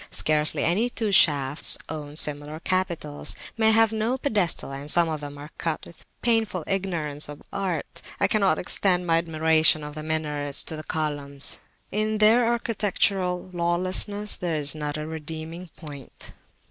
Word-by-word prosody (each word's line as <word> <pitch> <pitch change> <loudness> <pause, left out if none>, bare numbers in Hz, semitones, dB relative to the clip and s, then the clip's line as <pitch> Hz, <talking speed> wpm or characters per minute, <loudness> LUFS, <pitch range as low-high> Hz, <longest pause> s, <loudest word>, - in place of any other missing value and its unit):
Scarcely 155 0 +1
any 210 +9 +2
two 225 -4 -1
shafts 145 -6 +5
own 150 -2 -7
similar 150 0 +1
capitals; 170 -5 -2 0.2
many 220 -1 +3
have 225 0 +4
no 220 +4 -1
pedestal, 205 - 0
and 140 +2 -6
some 170 +1 +4
of 155 -2 -4
them 145 0 -8
are 145 +2 -10
cut 165 -2 -3
with 170 - -14
a - - -22 0.2
painful 225 -7 +1
ignorance 165 -7 -2
of 145 - -10
art. 185 -6 -4 0.2
I - - +3
cannot 195 -7 +2
extend 180 0 +1
my 165 -1 +3
admiration 160 -1 +3
of 150 0 -7
the 155 - -6
minarets 150 -2 -1
to 160 - -5
the 155 - -7
columns 145 -3 -1 0.3
in 215 +1 -1
their 225 +3 +4
"architectural 195 -5 -1
lawlessness" 185 +4 +1
there 170 -3 -3
is 150 -1 0
not 150 -1 -4
a 150 - -5
redeeming 160 +2 -7
point. 145 -5 -11
165 Hz, 160 wpm, -25 LUFS, 150-195 Hz, 0.3 s, shafts